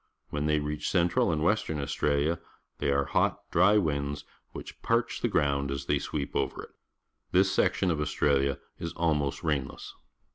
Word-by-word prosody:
Whenjthej^ 75 +1 +1
reaclLXJentral 85 +4 +1
and 80 -1 0
Western 85 -5 +1
Australia, 70 +3 0 0.4
they - - 0
are 70 0 +2
hot, - - +1
dry 95 +5 +5
winds, 70 -6 -1 0.3
which - - -9
parch 115 0 0
the - - +2
ground 70 -8 +1
as 70 0 -3
they 75 - +1
sweep 70 0 -4
over - - -1
it. - - -12 0.6
This 95 +1 +4
section 95 -1 +2
of 75 -2 -1
Australia 70 -2 +1 0.2
is 85 - -4
almost 75 -3 0
rainless. 75 -5 -2
75 Hz, 150 wpm, -29 LUFS, 70-85 Hz, 0.6 s, dry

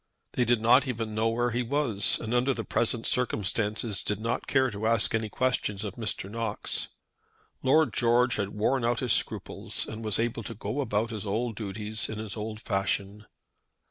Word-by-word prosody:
They 125 - +1
did 120 0 +3
not 125 +5 +5
even 115 -3 -3
know 110 +1 +1
where 120 +1 +1
he 120 +2 0
was, 125 -5 +1
and 115 +1 -3
under 125 +2 +2
the 115 - -3
present 115 0 0
circumstances 105 -2 0
did 105 -1 -2
not 115 +2 -2
care 130 -2 +3
to 105 +1 -2
ask 115 -2 +3
any 110 -1 0
questions 110 -4 0
of 100 -3 -4
Mr. 110 -4 -2
Knox. 110 0 -2 0.7
Lord 155 +4 +4
George 120 +1 +3
had 100 -2 -1
worn 115 +5 +1
out 120 0 +1
his 125 -3 +2
scruples, - - 0
and 110 +1 -6
was 110 -3 0
able 115 0 -1
to 115 +2 -7
go 110 +7 -2
about 110 -2 0
his 110 -2 -4
old 110 +3 -1
duties 105 +1 -4
in 110 - -4
his 110 -2 -5
old 110 0 -5
fashion. 100 +1 -1
115 Hz, 185 wpm, -28 LUFS, 105-120 Hz, 0.7 s, not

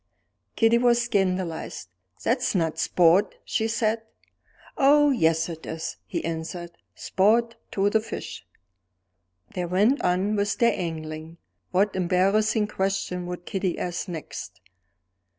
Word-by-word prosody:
Kitty 225 +1 +4
was 240 -1 +4
scandalized. 185 - -1 0.4
"That's 245 -2 +1
not 160 -3 0
sport!" 175 +3 +3
she 220 - 0
said. 225 0 0 0.7
"Oh, 290 +1 +5
yes, 165 -9 +2
it 165 -2 -8
is," 160 0 -5
he - - -3
answered 165 +1 -5 0.2
"sport 230 +4 +2 0.2
to 195 0 +2
the 220 - +4
fish." 220 - -7 1.1
They 180 - -2
went 205 +10 +2
on 185 +4 +1
with 205 0 0
their 235 -1 +4
angling. 160 -1 -5 0.3
What 195 +2 +1
embarrassing 195 +4 +2
question 195 -3 -2
would 180 0 -6
Kitty 190 -3 -2
ask 180 +1 -3
next? 135 - -7
190 Hz, 120 wpm, -25 LUFS, 170-220 Hz, 1.1 s, Oh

